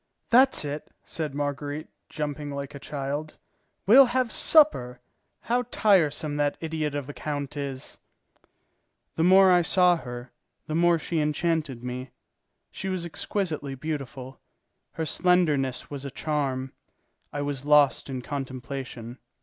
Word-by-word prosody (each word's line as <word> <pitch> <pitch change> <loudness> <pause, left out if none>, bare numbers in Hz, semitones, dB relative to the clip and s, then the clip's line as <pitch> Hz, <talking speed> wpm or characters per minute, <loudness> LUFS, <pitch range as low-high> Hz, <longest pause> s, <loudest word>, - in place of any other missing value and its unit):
"That's 255 - +5
it," 145 +1 -6
said 155 -4 -4
Marguerite, 145 +1 -3 0.2
jumping 145 -1 -4
like 140 0 -5
a 140 - -8
child, 145 +2 -5 0.5
"we'll 255 +6 +8
have 250 -1 0
supper. 125 - +4 0.4
How 245 +2 0
tiresome 155 -9 +2
that 145 -1 0
idiot 155 -2 -3
of 145 -2 -4
a 145 - -7
count 145 -1 -4
is!" 140 -2 -6 1.2
The 160 - +1
more 190 +1 +7
I 180 -1 +5
saw 180 0 +4
her, 125 -3 -8 0.3
the 155 - -5
more 170 +1 +4
she 165 0 -2
enchanted 150 -4 -1
me. 125 +1 -5 0.6
She 195 - -5
was 185 -2 -2
exquisitely 160 -5 -3
beautiful. 135 -3 -6 0.5
Her 160 - -3
slenderness 150 -8 +1
was 140 -1 -6
a 140 - -5
charm. 135 -3 -2 0.6
I 145 0 -3
was 140 -2 -3
lost 145 -2 +4
in 130 -2 -5
contemplation. 130 -3 -6
145 Hz, 135 wpm, -26 LUFS, 135-170 Hz, 1.2 s, we'll